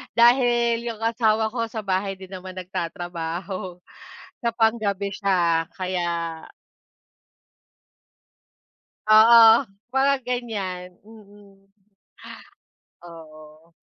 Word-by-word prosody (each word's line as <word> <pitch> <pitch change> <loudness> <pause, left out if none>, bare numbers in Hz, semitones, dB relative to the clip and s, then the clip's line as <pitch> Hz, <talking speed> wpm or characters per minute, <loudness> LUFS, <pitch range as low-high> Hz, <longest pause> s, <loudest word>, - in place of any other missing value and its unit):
dahil 235 -1 +3
yung 220 - -11
asawa 225 -1 +1
ko 235 -2 -2
sa 220 - -5
bahay 195 0 -2
din 190 - -10
naman 185 0 -9
nagtatrabaho 175 0 -6 0.6
sa 235 - +2
pang-gabi 215 -4 0
siya 175 -5 +1
kaya 170 -3 -3 2.7
Oo, 225 +3 +7 0.3
mga 270 +1 +3
ganyan 205 -8 -5
mm. 200 -2 -19 1.3
Oo. 160 -1 -15
195 Hz, 80 wpm, -23 LUFS, 175-225 Hz, 2.7 s, Oo